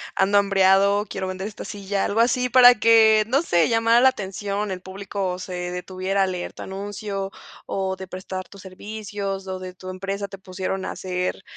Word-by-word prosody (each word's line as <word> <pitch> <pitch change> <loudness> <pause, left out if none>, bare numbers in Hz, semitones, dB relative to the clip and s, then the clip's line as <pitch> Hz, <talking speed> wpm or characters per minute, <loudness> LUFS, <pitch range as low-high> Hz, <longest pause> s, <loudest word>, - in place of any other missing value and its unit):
ando 200 +1 +3
hambreado, 200 +1 +4
quiero 190 - -4
vender 185 +1 -4
esta 215 - -8
silla, 200 -1 -2
algo 210 - -1
así, 250 +2 +2
para 245 0 +8
que, 220 -1 +5
no 270 +5 +2
sé, 175 - +2
llamara 230 +1 +4
la 260 - +7
atención, 200 -1 -4
el 185 -1 -5
público 190 -1 -4
se 185 0 -7 0.2
detuviera 185 +2 -1
a - - +1
leer 180 -1 -4
tu - - -9
anuncio 195 0 -5 0.3
o 190 -1 -2
de 190 0 -9
prestar 185 0 -6
tus 200 - -14
servicios, 200 0 -6
o 185 0 -4
de 185 -1 -7
tu 185 0 -10
empresa 195 +2 -4
te 195 0 -10
pusieron 190 0 -4
a - - -3
hacer 185 0 -3
195 Hz, 185 wpm, -23 LUFS, 185-205 Hz, 0.3 s, para